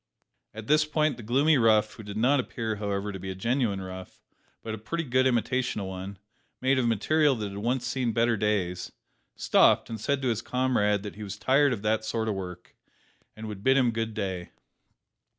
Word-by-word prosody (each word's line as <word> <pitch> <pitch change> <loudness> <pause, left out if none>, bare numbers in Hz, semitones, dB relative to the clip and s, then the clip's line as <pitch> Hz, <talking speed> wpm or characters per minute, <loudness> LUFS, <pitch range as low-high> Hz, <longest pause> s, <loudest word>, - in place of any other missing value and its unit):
At 110 -1 -7
this 150 +4 +4
point 155 0 0
the - - -8
gloomy 135 +6 +3
rough 110 -2 +3
who - - -10
did 105 -1 -7
not 130 +5 +3
appear, 115 -3 -3
however, 100 0 -2
to 95 - -7
be 95 +1 -6
a 95 - -4
genuine 115 0 0
rough, 95 0 -9 0.4
but 110 - -4
a 110 - -5
pretty 165 +10 -3
good 130 -2 +2
imitation 125 -1 0
of 100 - -4
one, 95 +1 -6 0.4
made 130 +1 +2
of 120 - +1
material 145 +6 +2
that 105 -3 -4
had 100 +1 -7
once 120 +3 -1
seen 125 -1 -1
better 115 +1 +2
days 100 -4 -1 0.4
stopped, - - +3
and 110 -2 -5
said 140 +2 -1
to 130 - +1
his 115 -1 -1
comrade 120 -5 +1
that 105 -1 -8
he - - -9
was 105 0 -6
tired 140 +5 +3
of 110 -5 -3
that 110 +1 +1
sort 110 0 -2
of 110 - 0
work, 90 -2 -8 0.6
and 110 0 -7
would 100 -2 -7
bid 130 +2 +4
him 125 -3 +3
good 115 -1 -3
day. 95 -4 -3
110 Hz, 205 wpm, -27 LUFS, 100-130 Hz, 0.6 s, this